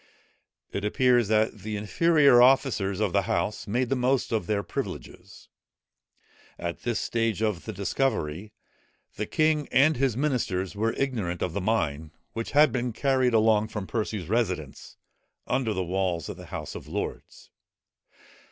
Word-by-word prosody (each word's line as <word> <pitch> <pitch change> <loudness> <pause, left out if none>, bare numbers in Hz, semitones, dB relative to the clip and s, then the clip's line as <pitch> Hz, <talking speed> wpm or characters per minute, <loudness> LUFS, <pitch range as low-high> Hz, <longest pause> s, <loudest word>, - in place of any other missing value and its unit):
It 100 - -4
appears 120 +2 +3
that 110 0 +1
the 105 +2 -5
inferior 140 +4 +4
officers 125 -7 +3
of 105 -4 0
the - - +3
House 105 0 -1
made 120 +4 0
the 135 - +1
most 130 +1 +1
of 110 -6 -1
their 100 -1 0
privileges. - - -7 1.1
At 85 -1 -4
this 120 -2 -1
stage 115 -2 -1
of 105 -5 -1
the - - -4
discovery, 100 - -2 0.6
the 105 - -3
king 155 -2 +1
and 145 +4 +4
his 130 -3 +1
ministers 110 -10 -1
were 110 +2 0
ignorant 110 -11 -2
of 90 - -2
the 100 - -2
mine, 80 -8 -1 0.2
which 115 0 -4
had 150 +1 +6
been 125 -2 -2
carried 130 -1 +2
along 110 -1 +3
from 105 -3 -5
Percy's 105 -5 -3
residence, 90 - -2 0.5
under 125 -3 0
the 95 -3 -2
walls 90 -2 -1
of - - -5
the - - -11
House - - -6
of - - -9
Lords. - - -6
110 Hz, 150 wpm, -26 LUFS, 95-125 Hz, 1.1 s, had